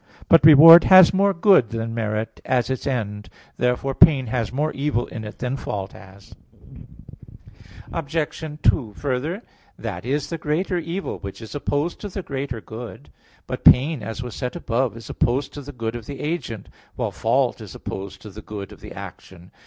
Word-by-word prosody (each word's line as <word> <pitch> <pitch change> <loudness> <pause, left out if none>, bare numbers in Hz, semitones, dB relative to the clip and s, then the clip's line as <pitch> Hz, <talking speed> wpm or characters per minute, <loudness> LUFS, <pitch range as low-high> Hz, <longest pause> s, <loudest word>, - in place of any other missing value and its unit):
But 165 - +6
reward 160 +2 +10
has 185 -2 +8
more 200 +1 +3
good 185 - +4
than 115 0 -4
merit, 110 -1 -3
as 130 0 0
its 130 - -4
end. 105 -6 -3 0.3
Therefore 125 +2 0
pain 135 -2 +5
has 115 -2 -2
more 150 +4 -1
evil 140 -4 -1
in 110 - -8
it 105 0 -9
than 125 +1 -3
fault 100 -7 -5
has. 95 +1 -15 1.6
Obj. 165 -1 -4 0.5
2: 115 -7 +2
Further, 145 - -3 0.3
that 85 - -6
is 140 +6 -2
the 165 - -4
greater 175 +5 -1
evil 170 +4 -5
which 100 -1 -8
is 110 -2 -10
opposed 145 +3 -2
to 205 - -5
the 195 0 -6
greater 135 -5 -5
good. 115 +2 -10 0.3
But - - -6
pain, 140 +2 +5
as 115 +3 -6
was 120 -3 -7
said 125 +4 -4
above 130 -6 -1
(A. - - -17
5), - - -9
is 115 - -11
opposed 130 +3 -1
to 145 - -7
the 145 +1 -9
good 115 -3 -4
of 115 -2 -8
the 140 -2 -7
agent, 145 - -4 0.3
while - - -2
fault - - 0
is - - -10
opposed 95 0 -7
to 105 - -10
the 105 +3 -10
good 105 -2 -8
of 105 - -14
the - - -10
action. 95 -2 -11
125 Hz, 185 wpm, -22 LUFS, 110-150 Hz, 1.6 s, reward